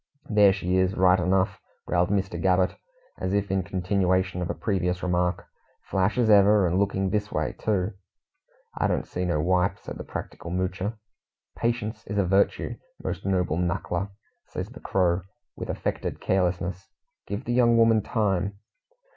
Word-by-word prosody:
"There 105 -2 +6
she 95 -1 0
is, 95 +1 +1
right 90 0 +5
enough," 95 +3 +1 0.2
growled 90 0 +1
Mr. 95 -4 -1
Gabbett, 90 0 +2 0.4
as 95 - -2
if 100 -1 0
in 95 0 +2
continuation 95 -1 0
of 90 - -2
a - - -2
previous 90 -3 -1
remark. 90 0 0 0.4
"Flash 95 +4 0
as 120 -2 +3
ever, 105 -1 +6
and 90 +2 +1
looking 95 -1 0
this 105 0 -1
way, - - -1
too." 105 -1 -1 0.8
"I - - +1
don't - - 0
see 90 - -3
no 85 -4 0
wipe," 90 +3 +2
said - - -8
the - - -4
practical 85 - -7
Moocher. 95 +4 -2 0.6
"Patience 115 -2 -2
is 105 - -3
a 100 - +3
virtue, 95 +2 +1 0.3
most - - -4
noble 90 -4 +1
knuckler!" 90 +2 -1 0.4
says 95 +3 -5
the 130 +3 -11
Crow, 90 -1 +1 0.3
with - - -6
affected - - -3
carelessness. 90 0 -1 0.4
"Give 100 +1 -4
the 120 - -1
young 120 -1 +4
woman 115 -1 +5
time." 100 -3 0
95 Hz, 160 wpm, -26 LUFS, 90-100 Hz, 0.8 s, There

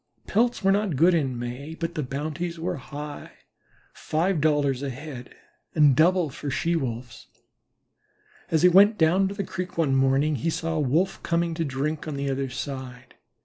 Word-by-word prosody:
Pelts 235 +2 +1
were 195 - +4
not 200 -4 +1
good 170 +7 +5
in 135 -7 0
May, 125 +6 -6
but 165 0 -4
the 155 - -2
bounties 155 +5 -4
were 165 -1 -3
high, 145 +2 -8 0.6
five 165 +1 -1
dollars 145 -4 +2
a 140 - -3
head, 130 -1 -9 0.4
and 150 -4 +5
double 170 +1 +3
for 145 - -6
She 165 +5 0
wolves. 125 -5 -5 1.2
As 160 0 +1
he - - +9
went 200 +4 +6
down 180 +4 +3
to 200 - -5
the 200 - -2
creek 180 -1 -6
one 145 -5 +2
morning 135 +3 +2
he 125 - -1
saw 165 0 -2
a 160 - -1
Wolf 155 +7 +1
coming 170 0 0
to 165 0 -2
drink 150 +2 -3
on 150 - -3
the 140 0 -2
other 135 0 -2
side. 125 -1 -7
155 Hz, 180 wpm, -25 LUFS, 135-170 Hz, 1.2 s, he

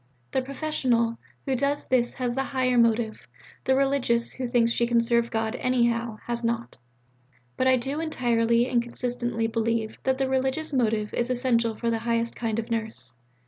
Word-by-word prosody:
The 265 - +1
'professional' 255 -4 0 0.3
who 270 - 0
does 280 +3 0
this 240 -2 +1
has 250 -2 -1
the 270 - 0
higher 260 -2 0
motive; 230 -1 +2 0.5
the 265 - +3
'religious' 265 -4 +1
who 255 -1 -4
thinks 235 -1 +2
she 235 0 +1
can 235 0 +3
serve 235 0 +2
God 225 -1 -1
'anyhow' 235 -3 +1
has 235 0 -3
not. 235 0 -2 0.8
But 260 - +1
I 260 - +6
do 270 +5 -2
entirely 240 -6 +2
and 240 -2 +2
constantly 240 -1 -2
believe 225 0 -1
that 265 0 +1
the 270 0 0
religious 265 +4 -1
motive 220 -4 +1
is 240 +1 -1
essential 240 -3 +1
for 230 +1 -1
the 225 - 0
highest 230 0 -1
kind 225 -2 -2
of 230 +1 -4
nurse. 220 - -3
235 Hz, 175 wpm, -26 LUFS, 230-260 Hz, 0.8 s, I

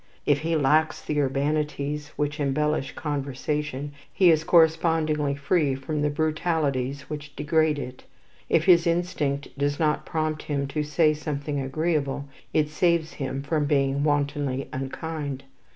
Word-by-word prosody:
If 145 -1 +3
he 165 +2 0
lacks 155 +2 +3
the 150 -1 -1
urbanities 145 +1 -1
which 150 +1 -2
embellish 150 0 0
conversation, 145 0 -3 0.2
he 180 -3 +5
is 160 -1 +2
correspondingly 160 -3 +3
free 140 -1 +1
from 145 +3 -3
the 150 - +2
brutalities 150 -3 0
which 150 -1 -7
degrade 155 0 +2
it. 130 -2 -7 0.4
If 165 - +3
his 175 -2 +6
instinct 155 -5 -1
does 145 0 0
not 155 -2 +1
prompt 155 -1 -2
him 140 -2 -2
to 150 +2 -1
say 155 +1 +3
something 150 -1 -3
agreeable, 140 0 -1 0.3
it 150 -1 +2
saves 170 0 +1
him 135 -1 -4
from 150 +1 0
being 140 -1 +1
wantonly 145 -2 0
unkind. 140 +1 -4
150 Hz, 135 wpm, -25 LUFS, 140-155 Hz, 0.4 s, his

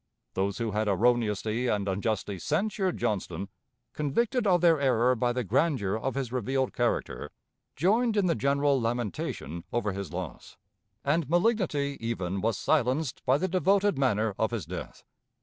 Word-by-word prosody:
Those 95 +1 -1
who 115 -2 -2
had 105 +1 0
erroneously 110 +2 +1
and 105 -3 0
unjustly 100 0 -2
censured 190 - 0
Johnston, 100 -4 -2 0.4
convicted 215 - 0
of 180 -3 +4
their 165 -3 +5
error 125 -2 +3
by 120 0 +1
the 125 +1 -1
grandeur 115 - +1
of 130 +5 -2
his 135 -4 -2
revealed 130 +2 -1
character, 120 -1 -1 0.5
joined 215 - +2
in 200 - +3
the 170 - +3
general 140 -2 +2
lamentation 105 - -3
over 110 -3 0
his 100 -2 -5
loss, 90 -2 -7 0.5
and 145 0 +1
malignity 175 -7 +1
even 100 -5 -2
was 110 -1 0
silenced 135 -1 0
by 130 +2 +5
the 185 - 0
devoted 195 +2 +2
manner 110 -5 +2
of 110 - +2
his 115 -4 -4
death. - - -7
125 Hz, 150 wpm, -28 LUFS, 105-155 Hz, 0.5 s, their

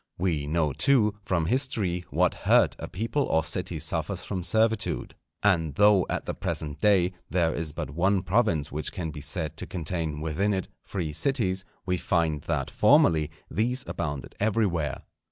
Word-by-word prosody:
We 80 -5 -1
know, 75 -2 +1
too, 105 - +3
from 95 -5 0
history, 100 - 0
what - - +2
hurt - - +3
a - - -5
people 115 +9 -1
or 80 0 +1
city 85 0 -2
suffers 80 +4 -2
from 95 -3 -3
servitude. 110 +4 +1 0.3
And 80 -8 +2
though, 105 -3 +5
at - - -2
the - - -3
present 75 0 -4
day, 95 -4 +4 0.2
there 85 -3 +1
is 80 -2 -3
but 70 - -5
one 95 +5 +1
province 90 -7 +1
which 75 +1 -1
can 85 -5 -4
be 75 -1 -8
said 80 +2 -3
to - - -3
contain 80 -3 -3
within 90 +7 0
it 95 - -3 0.2
free 85 -6 -4
cities, 95 - 0 0.2
we 90 -1 0
find 80 -4 0
that 75 -5 -1
formerly 80 -2 +4 0.2
these 125 +5 +1
abounded 75 -5 -4
everywhere. 100 -8 0
90 Hz, 165 wpm, -27 LUFS, 80-100 Hz, 0.3 s, though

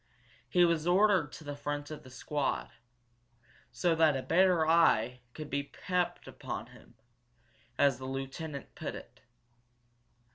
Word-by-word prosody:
He 175 -2 +5
was 165 -1 +1
ordered 185 -4 +4
to - - -10
the 145 -1 -5
front 145 +1 -4
of 155 - -7
the 130 - -14
squad 140 +2 -2 1.0
so 165 +8 +1
that 160 -3 +4
a 130 - -4
better 180 -1 +4
eye 125 -7 +3
could 155 -1 -6
be 140 0 -1
kept 180 +4 -2
upon - - -6
him, - - -18 0.8
as 140 -3 +3
the 130 - -7
lieutenant 135 +2 -6
put - - -5
it. - - -12
150 Hz, 140 wpm, -31 LUFS, 135-170 Hz, 1.0 s, He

